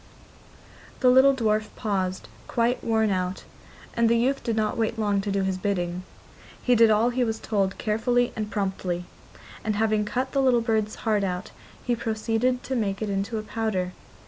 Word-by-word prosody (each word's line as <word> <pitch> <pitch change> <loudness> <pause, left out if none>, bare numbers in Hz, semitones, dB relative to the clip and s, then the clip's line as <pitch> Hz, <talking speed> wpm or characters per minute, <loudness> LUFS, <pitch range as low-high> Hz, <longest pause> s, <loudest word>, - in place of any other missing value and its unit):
The 250 -2 +6
little 265 +2 +6
dwarf 215 -3 +1
paused, 190 -3 -2 0.2
quite 240 +1 0
worn 220 -2 +2
out, 185 0 -2 0.5
and 235 -1 +3
the 235 - +4
youth 265 +4 +1
did 230 -3 -1
not 215 -1 0
wait 225 0 -1
long 205 -2 +1
to 200 0 -3
do 195 0 0
his 190 -1 -1
bidding. 180 -2 -1 0.6
He 250 - +2
did 230 -1 +6
all 220 +3 +3
he 250 +1 +1
was 225 -2 -2
told 195 -3 -1
carefully 240 +2 +1
and 215 -1 -3
promptly, 190 -4 -2 0.6
and 215 -1 -1
having 215 0 +2
cut 255 +5 -2
the 275 - +1
little 250 -3 +4
bird's 220 -2 0
heart 210 -2 +2
out 180 0 -3 0.3
he 245 - 0
proceeded 230 +2 -1
to 265 - -3
make 205 -3 -1
it 210 - -2
into 200 +3 -2
a 215 - -3
powder. 215 -5 -2
220 Hz, 180 wpm, -25 LUFS, 200-235 Hz, 0.6 s, The